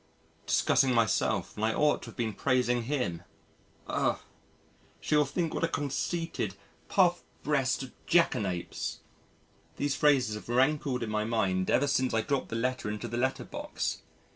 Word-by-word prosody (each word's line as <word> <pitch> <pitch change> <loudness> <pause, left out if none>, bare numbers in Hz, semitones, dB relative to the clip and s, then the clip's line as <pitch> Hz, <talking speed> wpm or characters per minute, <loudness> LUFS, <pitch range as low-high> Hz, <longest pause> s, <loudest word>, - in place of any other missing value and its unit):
Discussing 130 -2 +3
myself 115 -2 +1
when 105 - -4
I - - -1
ought 150 0 +2
to - - -9
have - - -10
been 115 -3 -2
praising 125 -1 +1
him! 125 - -1 0.6
Ugh! - - 0 0.8
She 155 - 0
will 150 0 +5
think 165 +2 -2
what - - -2
a - - +4
conceited, 145 - -2 0.3
puff 175 -3 +3 0.2
breasted 135 -3 0 0.2
Jackanapes. 100 - 0 0.8
These 145 -1 0
phrases 130 -6 +3
have 105 +2 -8
rankled 130 0 +2
in 110 - -4
my 105 0 0
mind 100 -5 0
ever 130 - +3
since 130 -3 +1
I 115 - +3
dropped 140 +3 -1
the - - -4
letter 125 -1 -1
into 105 +3 -4
the 120 +1 -4
letter 130 +2 0
box. - - -4
125 Hz, 155 wpm, -30 LUFS, 115-145 Hz, 0.8 s, will